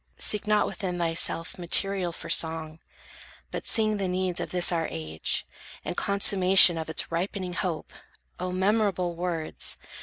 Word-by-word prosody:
Seek 210 Hz, 0 st, -2 dB
not 210 Hz, -1 st, +3 dB
within 185 Hz, -4 st, -4 dB
thyself 165 Hz, 0 st, 0 dB
material 180 Hz, +1 st, +2 dB
For -, -, -9 dB
song; 160 Hz, -1 st, 0 dB, 0.7 s
but -, -, -6 dB
sing 215 Hz, -1 st, +3 dB
the 195 Hz, -2 st, -2 dB
needs 180 Hz, -1 st, -1 dB
of -, -, -4 dB
this 180 Hz, -1 st, +2 dB
our 165 Hz, -2 st, -1 dB
age, 80 Hz, 0 st, -2 dB, 0.4 s
And -, -, -4 dB
consummation 195 Hz, -2 st, +5 dB
of 160 Hz, -, -6 dB
its 160 Hz, -, 0 dB
ripening 180 Hz, +2 st, -3 dB
hope!" 170 Hz, -2 st, -4 dB, 0.5 s
O 180 Hz, 0 st, -3 dB
memorable 190 Hz, -2 st, 0 dB
words! 170 Hz, -2 st, -1 dB
180 Hz, 145 wpm, -26 LUFS, 165-195 Hz, 0.7 s, consummation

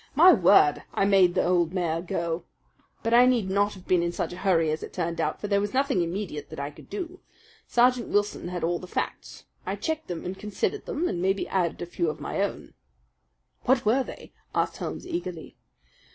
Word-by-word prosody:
My 350 Hz, +5 st, +8 dB
word! 175 Hz, -, +5 dB
I 195 Hz, -, +3 dB
made 190 Hz, -3 st, +4 dB
the -, -, +2 dB
old 175 Hz, -1 st, +2 dB
mare 170 Hz, -3 st, 0 dB
go! 170 Hz, -1 st, -2 dB, 0.6 s
But 230 Hz, +1 st, 0 dB
I 245 Hz, +1 st, +7 dB
need 230 Hz, -7 st, +2 dB
not 205 Hz, +1 st, +2 dB
have 185 Hz, -1 st, -14 dB
been 180 Hz, -2 st, +3 dB
in 170 Hz, 0 st, 0 dB
such 175 Hz, -, -3 dB
a -, -, -8 dB
hurry, 165 Hz, -5 st, +2 dB
as 155 Hz, -, -2 dB
it -, -, -8 dB
turned 170 Hz, -2 st, -2 dB
out; -, -, -1 dB
for 205 Hz, -, -4 dB
there 200 Hz, -1 st, +2 dB
was 205 Hz, +4 st, -3 dB
nothing 270 Hz, -8 st, +2 dB
immediate 170 Hz, -3 st, -4 dB
that -, -, -8 dB
I 140 Hz, +1 st, -3 dB
could -, -, -16 dB
do. 370 Hz, -2 st, -5 dB, 0.5 s
Sergeant 245 Hz, 0 st, +3 dB
Wilson 205 Hz, -3 st, 0 dB
had 175 Hz, -1 st, -4 dB
all 170 Hz, +1 st, 0 dB
the 180 Hz, -, -9 dB
facts. -, -, -5 dB, 0.2 s
I -, -, -3 dB
checked 315 Hz, -1 st, -3 dB
them 175 Hz, -2 st, -5 dB
and 185 Hz, +2 st, -5 dB
considered 210 Hz, -, -2 dB
them 335 Hz, +4 st, -1 dB
and 175 Hz, -, -2 dB
maybe 195 Hz, +2 st, 0 dB
added 175 Hz, -3 st, -1 dB
a -, -, -3 dB
few 170 Hz, -1 st, -1 dB
of 155 Hz, -, -5 dB
my -, -, -3 dB
own." -, -, -3 dB, 0.9 s
"What 255 Hz, -2 st, +3 dB
were 250 Hz, +5 st, +3 dB
they?" -, -, -11 dB, 0.2 s
asked -, -, 0 dB
Holmes -, -, -5 dB
eagerly. 335 Hz, -, -5 dB
190 Hz, 210 wpm, -26 LUFS, 170-235 Hz, 0.9 s, My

